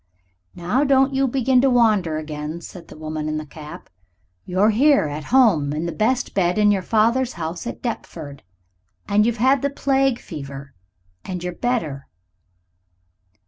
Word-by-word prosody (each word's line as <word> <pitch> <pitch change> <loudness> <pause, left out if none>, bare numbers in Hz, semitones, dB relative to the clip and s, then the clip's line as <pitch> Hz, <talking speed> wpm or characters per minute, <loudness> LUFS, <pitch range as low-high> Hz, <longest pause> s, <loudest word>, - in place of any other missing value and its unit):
"Now 180 +11 0
don't 270 -1 +3
you 270 0 +2
begin 260 0 +2
to 270 - +3
wander 215 -10 +2
again," 155 +1 -5
said 170 -1 -11
the - - -13
woman 155 0 -4
in 155 - -2
the 155 - -5
cap. 150 +1 -11 0.6
"You're 190 +4 +3
here 275 - +4
at 150 0 -5
home 195 - +3
in 155 +3 -3
the 170 - -2
best 245 +6 0
bed 180 -1 +1
in 210 -1 +4
your 195 -2 +1
father's 235 +6 +1
house 170 +5 -5
at - - -7
Deptford. 160 - -6 0.7
And 210 +2 +3
you've 235 0 -1
had 260 +3 +3
the 280 - 0
plague 270 -2 +1
fever. 140 -5 -9 0.5
And 180 -2 -5
you're 180 0 -3
better. 165 - -2
195 Hz, 160 wpm, -21 LUFS, 155-250 Hz, 0.7 s, here